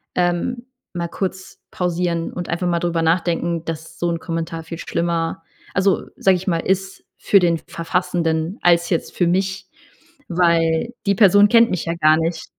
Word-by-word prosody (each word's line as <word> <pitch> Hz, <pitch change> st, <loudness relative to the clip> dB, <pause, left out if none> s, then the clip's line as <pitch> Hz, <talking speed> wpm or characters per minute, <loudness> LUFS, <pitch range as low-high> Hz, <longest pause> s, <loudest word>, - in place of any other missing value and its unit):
ähm, 180 Hz, +8 st, -1 dB, 0.3 s
mal 170 Hz, -1 st, -3 dB
kurz 185 Hz, +1 st, -5 dB
pausieren 175 Hz, -1 st, -1 dB
und 175 Hz, -1 st, -6 dB
einfach 175 Hz, +2 st, -2 dB
mal 170 Hz, -1 st, +1 dB
drüber 170 Hz, -1 st, -1 dB
nachdenken, 170 Hz, 0 st, 0 dB
dass 165 Hz, 0 st, -6 dB
so 175 Hz, -, 0 dB
'n 170 Hz, -, -2 dB
Kommentar 165 Hz, -1 st, -4 dB
viel 165 Hz, +1 st, -7 dB
schlimmer, 170 Hz, -1 st, -2 dB, 0.3 s
also, 195 Hz, 0 st, +2 dB
sage 190 Hz, -1 st, +3 dB
ich 180 Hz, -, -8 dB
mal, 170 Hz, -3 st, +1 dB
ist 190 Hz, +2 st, -2 dB
für 200 Hz, -, +4 dB
den 170 Hz, -2 st, +2 dB
Verfassenden 170 Hz, +1 st, -2 dB
als 170 Hz, 0 st, +3 dB
jetzt 170 Hz, -, -2 dB
für 175 Hz, -, +2 dB
mich, 190 Hz, +2 st, -1 dB, 0.6 s
weil 170 Hz, +3 st, +2 dB
die 200 Hz, 0 st, +2 dB
Person 205 Hz, 0 st, +6 dB
kennt 230 Hz, 0 st, +5 dB
mich 180 Hz, -3 st, -2 dB
ja 165 Hz, -, -1 dB
gar 155 Hz, -1 st, +4 dB
nicht.“ 165 Hz, 0 st, -2 dB
170 Hz, 165 wpm, -20 LUFS, 165-185 Hz, 0.6 s, Person